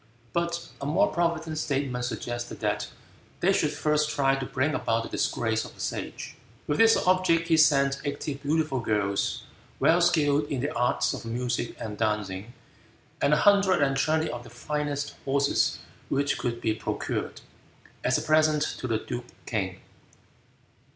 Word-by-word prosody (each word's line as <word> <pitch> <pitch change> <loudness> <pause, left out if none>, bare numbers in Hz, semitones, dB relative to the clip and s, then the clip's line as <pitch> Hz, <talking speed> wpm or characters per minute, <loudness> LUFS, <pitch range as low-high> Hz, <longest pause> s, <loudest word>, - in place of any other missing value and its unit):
But 170 0 -2
a 140 - -3
more 150 - +3
provident 165 -2 0
statesman 135 -4 -1
suggested 120 -1 -4
that - - -1 0.5
they 195 +3 +3
should 150 - +2
first 150 0 +1
try 135 -2 +2
to 135 -1 -4
bring 140 +3 0
about 115 0 0
the - - -7
disgrace 115 -1 0
of - - -11
the - - -20
Sage. - - -5 0.3
With 145 - -1
this 225 0 +7
object 180 -2 +3
he 160 - +5
sent 140 -3 +4
eighty 145 0 -3
beautiful 145 0 0
girls, 105 -3 0 0.4
well 175 +2 +4
skilled 150 -4 +3
in 145 -3 -3
the 145 +3 -2
arts 125 +1 +1
of - - -6
music 120 +1 -2
and 105 -3 -6
dancing, 105 -1 -1 0.7
and - - +3
a 150 - +5
hundred 200 -5 +5
and 135 -1 +1
twenty 155 +3 +1
of 120 - -5
the - - -12
finest 145 +3 -3
horses 140 +1 +2 0.3
which 140 0 0
could 120 -2 -2
be 110 - +1
procured, - - -3 0.6
as - - +3
a - - -3
present 155 -1 +3 0.2
to 130 - -3
the 115 -2 +1
duke 120 +2 -5 0.2
King. 95 -5 -3
140 Hz, 160 wpm, -27 LUFS, 120-155 Hz, 0.7 s, this